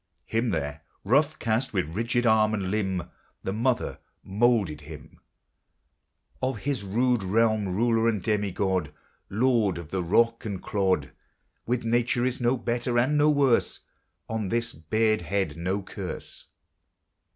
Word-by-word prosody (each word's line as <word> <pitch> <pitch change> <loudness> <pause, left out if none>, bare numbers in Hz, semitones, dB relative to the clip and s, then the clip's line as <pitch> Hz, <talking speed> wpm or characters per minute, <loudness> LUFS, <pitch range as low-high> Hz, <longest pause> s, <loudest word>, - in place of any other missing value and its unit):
Him, 115 +2 0
there, 75 -5 -3 0.2
rough 140 +9 +2
cast, 115 +3 -1
with 85 -3 -1
rigid 120 +2 0
arm 110 -1 +4
and 95 -3 -2
limb, 95 -5 -2 0.3
The 95 - -2
Mother 120 +3 0 0.2
moulded 100 -7 +1
him, 75 0 -12 1.2
Of 130 -2 -1
his 140 -6 -1
rude 120 +4 +1
realm 110 +2 +2
ruler 115 +1 +2
and 110 -3 +1
demigod, 95 -5 0 0.4
Lord 110 -4 +2
of 85 -3 -8
the 95 - -1
rock 115 +6 +2
and 100 -4 -4
clod. 95 -10 0 0.6
With 120 0 -1
Nature 120 +1 +1
is 130 0 -2
no 120 +2 +2
"better" 120 0 -1
and 130 +5 +3
no 150 +1 +4
"worse," 140 -5 +2 0.5
On 110 -3 -2
this 115 +2 -1
bared 110 +7 +1
head 95 +3 -1
no 95 +4 -2
curse. - - -7
110 Hz, 140 wpm, -26 LUFS, 95-120 Hz, 1.2 s, arm